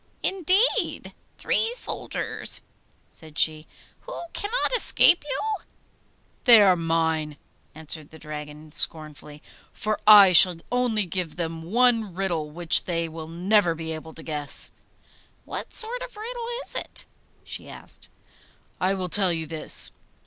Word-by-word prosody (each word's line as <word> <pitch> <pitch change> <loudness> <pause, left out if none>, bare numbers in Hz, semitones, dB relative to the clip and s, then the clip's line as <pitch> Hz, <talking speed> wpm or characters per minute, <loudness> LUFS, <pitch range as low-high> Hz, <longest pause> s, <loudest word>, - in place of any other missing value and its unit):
'Indeed! 385 +5 0 0.2
three 455 +2 0
soldiers!' - - -2 0.5
said 155 -1 -13
she. 155 0 +1 0.3
'Who - - -9
cannot 485 +4 -1
escape 350 -7 +4
you?' 355 +10 -3 0.8
'They 235 -3 +9
are 190 -2 +5
mine,' 160 -2 -1 0.4
answered 155 -1 -6
the 160 - -14
Dragon 150 0 -9
scornfully, 150 -1 -2 0.3
'for 215 +1 -3
I 205 -3 +9
shall 180 0 +9 0.2
only 245 -4 0
give 175 -3 -5
them 165 -1 -5
one 225 +1 +1
riddle 175 -5 -3
which 160 0 +2
they 170 -2 -2
will 160 0 -9
never 175 +1 +1
be 160 0 -5
able 160 0 -10
to 160 - -11
guess.' 150 -2 -1 0.7
'What - - -7
sort 485 +3 0
of - - -9
a - - -10
riddle 470 +1 -6 0.2
is - - -2
it?' - - -3 0.4
she - - -8
asked. - - -10 0.7
'I 190 +2 +1
will 185 -1 -4
tell 190 0 +2
you 165 -1 -3
this. 155 0 +1
175 Hz, 135 wpm, -24 LUFS, 160-240 Hz, 0.8 s, They